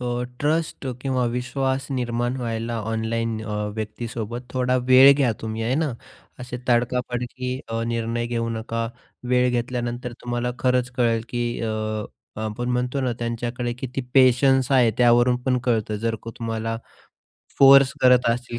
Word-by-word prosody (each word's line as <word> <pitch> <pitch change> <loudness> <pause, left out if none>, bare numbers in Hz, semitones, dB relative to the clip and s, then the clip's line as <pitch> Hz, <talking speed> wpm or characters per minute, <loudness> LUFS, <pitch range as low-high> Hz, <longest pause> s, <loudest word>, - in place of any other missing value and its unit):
अ, 120 0 -2
ट्ट्रस्ट 145 +5 -2
किंवा 130 -1 0
विश्वास 130 +2 -2
निर्माण 120 0 -1
व्हायला 115 -1 -3
ऑनलाईन 110 0 -2
अ, 105 - -5 0.2
व्यक्तीसोबत 115 +1 -5
थोडा 125 0 +1
वेळ 130 +2 +9
घ्या 135 -4 +2
तुम्ही 110 0 -4
आहे 120 +3 0
ना. 155 -2 0 0.5
असे 125 0 -6
तडका-फडकी 125 +1 -1
अ, 115 0 -2
निर्णय 115 0 -2
घेऊ 115 -1 -2
नका. 115 0 -3 0.4
वेळ 125 0 +3
घेतल्यानंतर 120 0 -3
तुम्हाला 120 0 -2
खरंच 125 -1 +1
कळेल, 115 -2 +2
की 120 -1 -2 0.2
अ, 115 - -2 0.7
आपण 110 +3 -3
म्हणतो 125 +2 -1
ना, 130 -2 0
त्यांच्याकडे 120 +1 -3
किती 130 +1 -4
पेशन्स 130 0 +4
आहे 125 -4 +5
त्यावरून 120 0 +5
पण 125 0 +1
कळतं. 110 -3 0
जर 115 +1 -1
का 115 - -6
तुम्हाला 115 -1 -3 0.8
फोर्स 135 -1 +8
करत 125 -1 +5
असतील 120 0 -2
120 Hz, 140 wpm, -23 LUFS, 115-125 Hz, 0.8 s, वेळ